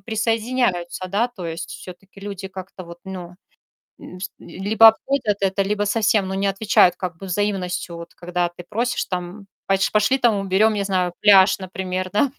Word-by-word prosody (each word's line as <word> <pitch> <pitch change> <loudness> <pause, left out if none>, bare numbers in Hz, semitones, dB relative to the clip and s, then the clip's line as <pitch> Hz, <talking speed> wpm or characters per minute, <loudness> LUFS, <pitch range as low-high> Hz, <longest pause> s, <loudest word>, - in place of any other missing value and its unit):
присоединяются, 225 -5 -1
да, 205 +6 0
то 205 -7 -10
есть, 165 +1 -5
всё-таки 185 +3 -11
люди 195 -1 -6
как-то 190 0 -9
вот, 170 0 -11
ну. 180 -2 -8 0.6
М, 180 - -11
пс 185 0 -5
либо 210 +4 +3
обходят 225 -1 0
это, 195 0 +1
либо 205 +1 -1
совсем, 205 -2 +1
ну, 190 - -3
не 195 +1 0
отвечают 195 -2 +3
как 180 -3 -5
бы 195 - -8
взаимностью, 185 -3 -2
вот 170 0 -10
когда 175 0 -2
ты 175 +1 -12
просишь 235 +4 -1
там 180 +2 -5 0.2
поч 195 0 +1
пошли, 215 +5 +3
там, 240 -4 +3
уберем, 195 +3 +2
не 205 - -1
знаю, 185 -3 0
пляж, 195 -2 +6
например, 185 0 -4
да. 255 +6 +2
195 Hz, 175 wpm, -21 LUFS, 180-210 Hz, 0.6 s, пляж